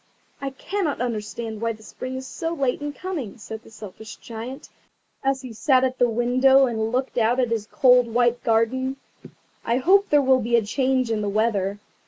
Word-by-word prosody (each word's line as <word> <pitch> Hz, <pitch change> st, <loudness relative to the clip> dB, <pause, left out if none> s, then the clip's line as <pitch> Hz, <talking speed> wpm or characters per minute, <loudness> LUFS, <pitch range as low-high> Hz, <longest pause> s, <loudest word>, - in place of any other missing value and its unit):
"I 275 Hz, -, -2 dB
cannot 320 Hz, +3 st, -3 dB
understand 225 Hz, -1 st, -4 dB
why 230 Hz, 0 st, 0 dB
the 220 Hz, 0 st, -15 dB
Spring 255 Hz, +3 st, -7 dB
is 260 Hz, 0 st, -5 dB
so 330 Hz, +5 st, -4 dB
late 270 Hz, -2 st, -1 dB
in 290 Hz, 0 st, -3 dB
coming," 290 Hz, -, -5 dB
said 220 Hz, 0 st, -8 dB
the -, -, -17 dB
Selfish 220 Hz, 0 st, -10 dB
Giant, 240 Hz, +5 st, -8 dB, 0.6 s
as 270 Hz, -1 st, 0 dB
he 250 Hz, -3 st, -8 dB
sat 260 Hz, +3 st, +3 dB
at 260 Hz, 0 st, -1 dB
the 245 Hz, -, +4 dB
window 255 Hz, +4 st, +4 dB
and 225 Hz, -2 st, -2 dB
looked 255 Hz, 0 st, -1 dB
out 235 Hz, +3 st, +2 dB
at 245 Hz, -2 st, +1 dB
his 220 Hz, -2 st, -1 dB
cold 250 Hz, -2 st, +4 dB
white 240 Hz, +1 st, +2 dB
garden; 255 Hz, +4 st, +1 dB, 0.7 s
"I 235 Hz, -, +1 dB
hope 395 Hz, +9 st, +4 dB
there 295 Hz, -, +5 dB
will 260 Hz, -1 st, +4 dB
be 235 Hz, +2 st, +1 dB
a 230 Hz, -3 st, +2 dB
change 255 Hz, +1 st, 0 dB
in 215 Hz, -1 st, 0 dB
the 205 Hz, -, -1 dB
weather." 205 Hz, -2 st, 0 dB
245 Hz, 195 wpm, -23 LUFS, 225-265 Hz, 0.7 s, there